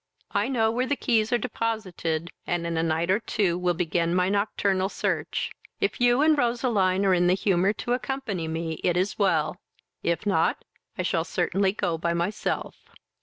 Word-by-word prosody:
I 205 +3 +1
know 225 -4 +2
where 250 +3 0
the 285 - +1
keys 225 -5 +1
are 240 - +4
deposited, 185 -9 -3 0.2
and 175 -1 -1
in 170 0 -2
a 160 - +1
night 165 +2 0
or 195 - +3
two 195 -6 0
will 180 0 0
begin 170 0 0
my 180 0 +2
nocturnal 200 -1 +1
search. - - -2 0.3
If 405 -10 -1
you 245 +3 +4
and 310 0 +5
Roseline 230 -7 +1
are 190 - +4
in 175 0 +3
the 180 - +4
humour 190 0 +2
to 240 +3 -2
accompany 230 -8 -3
me, 160 0 -3
it 175 -1 +2
is 190 +4 -1
well; 170 -7 +2 0.4
if 170 +4 -1
not, 200 - +1 0.3
I - - -1
shall - - 0
certainly 195 -1 +1
go 175 -6 -1
by 170 +1 0
myself." 175 +5 -3
190 Hz, 180 wpm, -26 LUFS, 170-225 Hz, 0.4 s, and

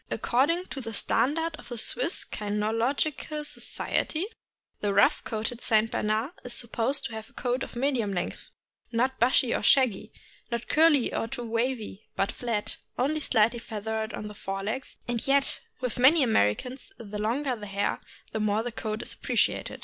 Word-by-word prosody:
According 315 +9 +2
to 270 - -4
the 225 -2 -5
standard 310 +11 +1
of - - -13
the 240 - -5
Swiss 485 - +1
Kynological 230 +9 -1
Society, 315 +3 -1 0.5
the 205 -1 0
rough 200 - +5
coated 225 +2 -3
St. 220 0 +3
Bernard 215 +6 0
is 245 - -3
supposed 235 +4 0
to - - -4
have 220 0 -7
a - - -25
coat 250 +1 -1
of - - -5
medium 240 -5 +1
length, 180 -2 -4 0.4
not 255 +3 +1
bushy 245 0 +4
or - - 0
shaggy, 255 -7 +3 0.4
not 235 -1 -3
curly 305 -5 +4
or 225 - -1
too 245 +1 -5
wavy, 230 -3 -2
but 195 - +1
flat, 230 -4 -3 0.2
only 295 +5 +1
slightly 235 -4 +2
feathered 220 0 -3
on 210 - -5
the 210 - -8
fore 195 -1 -4
legs; 225 +6 -4
and 240 0 0
yet 275 0 +3 0.2
with 250 -1 -2
many 280 +5 +7
Americans 240 - +1
the 210 -1 -6
longer 250 +5 0
the 210 -2 -8
hair 200 +1 -1 0.3
the 220 - -2
more 215 +1 +1
the 245 - -3
coat 215 -1 -3
is - - -4
appreciated. - - 0
235 Hz, 170 wpm, -28 LUFS, 215-265 Hz, 0.5 s, many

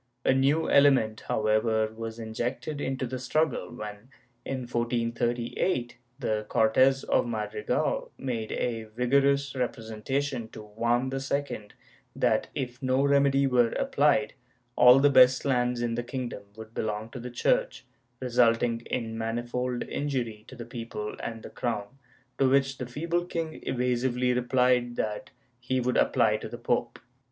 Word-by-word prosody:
A - - +5
new 140 +4 +2
ele 140 0 +7
ment, 110 -5 0
however, 110 0 +1
was 115 0 -6
injected 120 +6 -4
into 130 0 -2
the 130 +1 -5
struggle 155 +3 0
when, 105 0 -8 0.3
in 130 -1 -3
1438, 120 +2 -1 0.2
the 110 -5 -1
Cortes 130 +5 +3
of - - +1
Madrigal 105 -2 -2
made 115 -4 -3
a 115 -2 -2
vigorous 135 +4 +1
representation 125 +2 -2
to 110 - -10
Juan 120 +4 0
II 135 -5 -3 0.5
that, - - +1
if 125 -1 -4
no 130 +1 +2
remedy 140 -1 +3
were 125 -3 +3
applied, 140 -1 +2 0.4
all 125 +1 +8
the 140 +1 +5
best 130 0 +6
lands 125 -2 +1
in 120 -1 -1
the 120 - -1
kingdom 120 -3 -5
would 110 0 -11
belong 110 0 -3
to 125 - -7
the 125 +1 -6
Church, - - 0 0.3
resulting 120 -2 +2
in 115 -2 -3
manifold 120 +2 -2
injury 120 -7 -3
to 130 - -11
the 120 -2 -8
people 115 -3 -6
and 115 -1 -6
the - - -9
crown, 115 -4 -2 0.5
to 135 -1 +4
which 135 0 +2
the 125 - -4
feeble 170 +7 -1
king 165 -2 -4
evasively 125 0 +1
replied 125 -1 +2
that 105 -2 -3 0.3
he 130 +1 -1
would 125 0 0
apply 110 -4 +3
to 110 - -7
the 120 - -7
pope. 120 0 -1
125 Hz, 145 wpm, -28 LUFS, 115-135 Hz, 0.5 s, all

